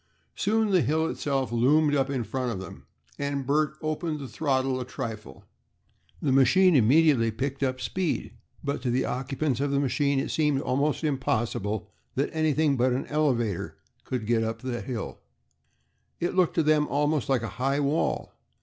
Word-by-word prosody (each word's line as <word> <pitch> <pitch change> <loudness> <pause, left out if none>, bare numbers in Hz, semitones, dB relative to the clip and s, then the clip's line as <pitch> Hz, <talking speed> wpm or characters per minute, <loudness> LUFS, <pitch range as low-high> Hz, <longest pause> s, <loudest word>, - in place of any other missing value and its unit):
Soon 220 0 +1
the 185 -3 +4
hill 160 +2 +1
itself 135 -6 -1
loomed 145 +6 +3
up 135 -1 +1
in 130 -4 -1
front 125 +1 -2
of 100 - -4
them, 95 - -10 0.3
and 140 -1 -2
Bert 150 +2 +1
opened 155 0 -2
the 140 -2 -7
throttle 130 -2 0
a - - -2
trifle. 110 - -7 0.8
The 140 - +2
machine 160 +8 +5
immediately 135 -1 +4
picked 135 +5 -3
up 130 -1 0
speed, 175 +6 -2 0.3
but 140 0 -2
to 130 - -1
the 125 +2 +1
occupants 135 +1 -2
of 140 +1 0
the 140 0 +1
machine 140 0 +1
it 135 - -2
seemed 150 -3 +2
almost 140 +4 0
impossible 115 - -1 0.3
that - - -1
anything 155 -2 +2
but 125 +1 +2
an 130 - -2
elevator 125 - 0 0.3
could 125 -4 -3
get 115 0 +2
up 115 +1 -4
that 125 -2 -4
hill. 120 -6 -5 1.0
It 175 - -1
looked 185 -3 +2
to 165 - +3
them 150 -1 +3
almost 145 -1 0
like 130 -4 +2
a - - -2
high 135 +2 +1
wall. 145 +2 0
140 Hz, 170 wpm, -27 LUFS, 125-150 Hz, 1.0 s, machine